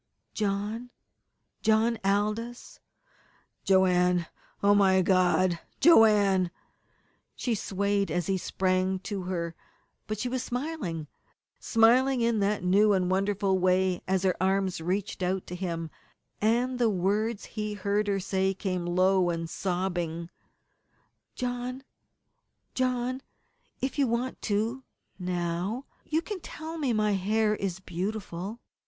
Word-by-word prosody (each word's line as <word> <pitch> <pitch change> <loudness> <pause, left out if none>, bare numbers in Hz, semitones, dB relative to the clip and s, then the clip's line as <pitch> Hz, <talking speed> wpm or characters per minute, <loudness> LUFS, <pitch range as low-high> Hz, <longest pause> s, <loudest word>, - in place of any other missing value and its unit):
"John 210 +3 -2 0.7
John 220 +1 +2
Aldous 215 +4 -1 0.4
" - - -36
"Joanne! 180 -2 +3 0.4
Oh, 200 0 +6
my 190 -2 +4
God! 185 -1 +3 0.2
Joanne!" 205 - +5 0.9
She 245 - -1
swayed 200 -1 0
as 175 -2 -1
he 195 - +1
sprang 185 0 0
to 195 -2 -4
her, 170 -2 -3 0.5
but 215 0 -3
she 250 - -2
was 255 0 -2
smiling 245 - -3 0.5
smiling 250 +3 +4
in 230 -1 +2
that 200 -1 0
new 200 +3 +4
and 185 -1 +1
wonderful 195 0 +1
way 185 0 +2
as 190 0 +1
her 185 -2 +2
arms 190 -2 +1
reached 190 +4 -2
out 185 +1 -1
to 180 - -6
him, 170 -3 -4 0.5
and 245 +4 +1
the 235 -2 +4
words 205 +3 0
he 210 -1 -4
heard 205 +1 0
her 200 -1 +1
say 190 0 0
came 185 -3 -2
low 185 +1 +3
and 165 -1 -3
sobbing: 175 -2 -2 1.0
"John 250 +1 -3 0.9
John, 255 0 -1 0.6
if 265 +2 -2
you 275 - +4
want 240 +2 -2
to, 225 +6 0 0.4
now 180 +6 -2 0.2
you 320 +2 0
can 410 0 -5
tell 320 0 -7
me 280 -4 0
that - - +1
my 210 -1 +2
hair 210 +2 +1
is 190 -3 -3
beautiful!" 190 +2 -4
200 Hz, 125 wpm, -28 LUFS, 185-225 Hz, 1.0 s, Oh